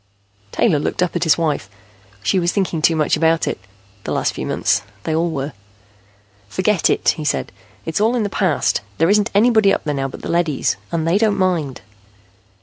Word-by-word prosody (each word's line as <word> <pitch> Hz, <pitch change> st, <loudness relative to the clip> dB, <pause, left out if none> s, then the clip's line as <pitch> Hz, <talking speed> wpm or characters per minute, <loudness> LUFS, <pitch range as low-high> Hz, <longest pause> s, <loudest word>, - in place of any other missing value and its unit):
Taylor 175 Hz, -11 st, +2 dB
looked 165 Hz, -, -1 dB
up 180 Hz, -, -2 dB
at 175 Hz, 0 st, 0 dB
his 160 Hz, -, +4 dB
wife. 150 Hz, -, -1 dB, 0.5 s
She 185 Hz, -, +2 dB
was 175 Hz, 0 st, +1 dB
thinking 185 Hz, -5 st, -1 dB
too 165 Hz, +1 st, +3 dB
much 155 Hz, -2 st, +2 dB
about 165 Hz, +1 st, +2 dB
it, -, -, -2 dB, 0.4 s
the -, -, -4 dB
last -, -, 0 dB
few -, -, -5 dB
months. -, -, +1 dB, 0.2 s
They 160 Hz, -, -2 dB
all 165 Hz, +2 st, +1 dB
were. 140 Hz, -2 st, -4 dB, 1.0 s
"Forget 190 Hz, -, +1 dB
it," -, -, +2 dB
he 155 Hz, -, -5 dB
said. 150 Hz, -, -1 dB, 0.3 s
"It's 160 Hz, +4 st, -1 dB
all 225 Hz, +3 st, +3 dB
in 235 Hz, -, 0 dB
the -, -, 0 dB
past. 185 Hz, -, 0 dB, 0.2 s
There 165 Hz, +4 st, +3 dB
isn't 210 Hz, +1 st, +3 dB
anybody 220 Hz, -2 st, +5 dB
up -, -, 0 dB
there 150 Hz, -, -2 dB
now 135 Hz, -1 st, -1 dB
but 135 Hz, -, -10 dB
the -, -, -4 dB
leadys, 170 Hz, -5 st, +1 dB, 0.2 s
and 165 Hz, -1 st, -1 dB
they 175 Hz, +5 st, +3 dB
don't 215 Hz, -2 st, +2 dB
mind." 170 Hz, -8 st, -1 dB
170 Hz, 200 wpm, -19 LUFS, 155-195 Hz, 1.0 s, anybody